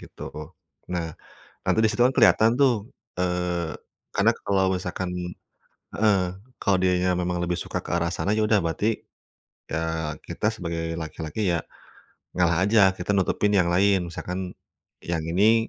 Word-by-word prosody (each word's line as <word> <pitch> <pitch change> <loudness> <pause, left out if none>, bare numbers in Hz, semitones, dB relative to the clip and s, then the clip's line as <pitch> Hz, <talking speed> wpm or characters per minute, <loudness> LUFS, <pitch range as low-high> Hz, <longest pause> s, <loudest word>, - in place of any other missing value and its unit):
gitu. - - -9 0.6
Nah, 85 -2 -2 0.5
nanti - - +2
disitu 110 +2 +1
kan 125 - +5
kelihatan 115 -1 +5
tuh, 120 -5 +3 0.3
eee, 90 -2 -1 0.4
karena - - +4
kalau 95 -1 +2
misalkan 90 0 -3 0.9
heeh, 105 -2 +3 0.4
kalau 100 - +3
dianya 90 0 +2
memang 90 -1 -1
lebih 90 0 -1
suka - - -4
ke - - -8
arah 85 0 +1
sana 95 - -1
ya 110 - +1
udah 105 -3 +3
berarti, 105 +7 0 0.7
ya 80 -1 -2
kita 105 - -1
sebagai 85 -5 -4
laki-laki 80 +5 -4
ya 85 - 0 0.7
ngalah 85 0 +2
aja, 100 -2 +5
kita 90 +2 -4
nutupin 100 +1 +1
yang 90 -4 +4
lain 95 0 +3
misalkan 90 +1 -5 0.5
yang 85 -1 -1
ini 110 +6 +4
90 Hz, 140 wpm, -25 LUFS, 85-105 Hz, 0.9 s, kan